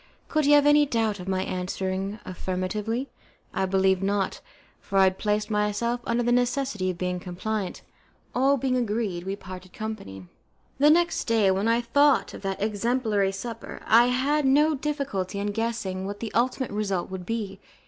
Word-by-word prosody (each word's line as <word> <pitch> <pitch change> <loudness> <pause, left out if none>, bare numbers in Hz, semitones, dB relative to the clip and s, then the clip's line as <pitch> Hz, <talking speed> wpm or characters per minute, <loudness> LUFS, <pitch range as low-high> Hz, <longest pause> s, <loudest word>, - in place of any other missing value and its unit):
Could 310 -2 +1
he 290 - +5
have 290 -1 +6
any 295 0 +5
doubt 225 -5 0
of 180 - -8
my 190 -1 0
answering 190 +2 -3
affirmatively? 200 +7 -3 0.4
I 190 - 0
believe 190 0 +2
not, 195 0 -1 0.4
for 195 - -3
I 195 - +7
had 190 0 +2
placed 210 0 0
myself 210 +3 0
under 235 +1 +1
the 240 - +1
necessity 245 -5 +1
of 180 - -3
being 180 0 -2
compliant. 190 +2 -4 0.5
All 270 +3 +3
being 255 0 0
agreed, 210 -7 -1
we 195 +1 -2
parted 185 -1 -10
company. 210 - -6 0.5
The 290 +2 +6
next 340 +2 +3
day, 220 -4 +3
when 195 +3 0
I 230 +1 +3
thought 285 +4 +3
of - - -9
that 195 -1 -3
exemplary 215 -2 +1
supper, 230 +4 -7
I 235 +2 +6
had 275 +4 +1
no 295 +4 +4
difficulty 275 -10 -3
in 205 +1 -1
guessing 205 -4 -2
what 205 0 -6
the 225 - -5
ultimate 255 +2 0
result 200 -4 -2
would 190 -1 -5
be. 210 -4 -3
210 Hz, 170 wpm, -26 LUFS, 190-245 Hz, 0.5 s, I